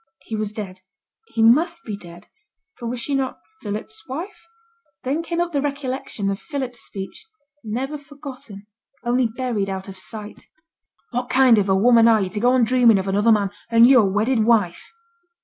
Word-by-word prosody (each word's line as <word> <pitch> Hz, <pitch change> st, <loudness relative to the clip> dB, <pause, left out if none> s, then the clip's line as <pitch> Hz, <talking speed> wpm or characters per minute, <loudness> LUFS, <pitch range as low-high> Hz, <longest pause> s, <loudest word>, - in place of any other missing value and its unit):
He 225 Hz, -, -5 dB
was 215 Hz, -1 st, -2 dB
dead; 195 Hz, -4 st, -7 dB, 0.5 s
he 225 Hz, -, 0 dB
must 325 Hz, +10 st, +4 dB
be 215 Hz, -, -4 dB
dead; 175 Hz, -1 st, -13 dB, 0.5 s
for 240 Hz, -, -7 dB
was 245 Hz, +1 st, -3 dB
she 280 Hz, +4 st, -3 dB
not 270 Hz, -1 st, -1 dB, 0.2 s
Philip's 220 Hz, +1 st, -6 dB
wife? 345 Hz, +12 st, -7 dB, 0.6 s
Then 280 Hz, +5 st, -1 dB
came 335 Hz, 0 st, -3 dB
up 345 Hz, 0 st, 0 dB
the 285 Hz, -3 st, 0 dB
recollection 265 Hz, -7 st, -3 dB
of 195 Hz, -, -4 dB
Philip's 260 Hz, -5 st, -5 dB
speech, 195 Hz, -, -7 dB, 0.4 s
never 260 Hz, +7 st, -3 dB
forgotten, 275 Hz, -8 st, -11 dB, 0.4 s
only 245 Hz, 0 st, +2 dB
buried 225 Hz, -4 st, -2 dB
out 190 Hz, 0 st, -5 dB
of 190 Hz, -1 st, -9 dB
sight: 210 Hz, +1 st, -8 dB, 0.6 s
'What 245 Hz, +1 st, -3 dB
kind 255 Hz, -4 st, +5 dB
of 200 Hz, -1 st, 0 dB
a 190 Hz, -, +4 dB
woman 230 Hz, +3 st, +5 dB
are 225 Hz, -1 st, +5 dB
yo' 190 Hz, -2 st, -1 dB
to 210 Hz, +3 st, -4 dB
go 245 Hz, +3 st, +3 dB
on 255 Hz, -1 st, +4 dB
dreaming 235 Hz, -2 st, +5 dB
of 190 Hz, 0 st, -2 dB
another 205 Hz, +4 st, +3 dB
man, 205 Hz, -3 st, +2 dB, 0.2 s
and 230 Hz, 0 st, +7 dB
yo' 255 Hz, -1 st, +7 dB
a 200 Hz, -, +1 dB
wedded 220 Hz, +4 st, +1 dB
wife?' 215 Hz, -6 st, +1 dB
230 Hz, 185 wpm, -22 LUFS, 205-260 Hz, 0.6 s, and